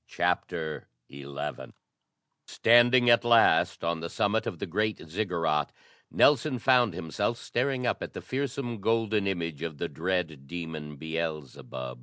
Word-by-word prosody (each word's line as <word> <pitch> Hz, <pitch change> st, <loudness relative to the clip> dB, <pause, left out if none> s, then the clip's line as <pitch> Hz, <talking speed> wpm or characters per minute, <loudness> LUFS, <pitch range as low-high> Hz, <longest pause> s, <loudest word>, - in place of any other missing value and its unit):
CHAPTER 80 Hz, -3 st, -2 dB, 0.2 s
XI 70 Hz, 0 st, -10 dB, 1.2 s
Standing 120 Hz, +1 st, +5 dB
at 120 Hz, 0 st, +5 dB
last 120 Hz, -6 st, +4 dB
on 85 Hz, 0 st, -1 dB
the 85 Hz, +1 st, -5 dB
summit 110 Hz, +5 st, 0 dB
of 85 Hz, -, -4 dB
the -, -, -4 dB
great 105 Hz, +4 st, -1 dB
Ziggurat, 85 Hz, -5 st, -1 dB, 0.4 s
Nelson 145 Hz, -1 st, +3 dB
found 125 Hz, -6 st, +3 dB
himself 95 Hz, +7 st, -2 dB
staring 125 Hz, +1 st, -2 dB
up -, -, -1 dB
at -, -, -6 dB
the -, -, -6 dB
fearsome 130 Hz, -4 st, -3 dB
golden 110 Hz, -2 st, +1 dB
image 85 Hz, -6 st, -3 dB
of 80 Hz, -3 st, -5 dB
the -, -, -2 dB
dread 80 Hz, -5 st, -3 dB
demon 80 Hz, -3 st, -6 dB
Beelzebub. 75 Hz, -5 st, -5 dB
90 Hz, 135 wpm, -28 LUFS, 80-120 Hz, 1.2 s, Standing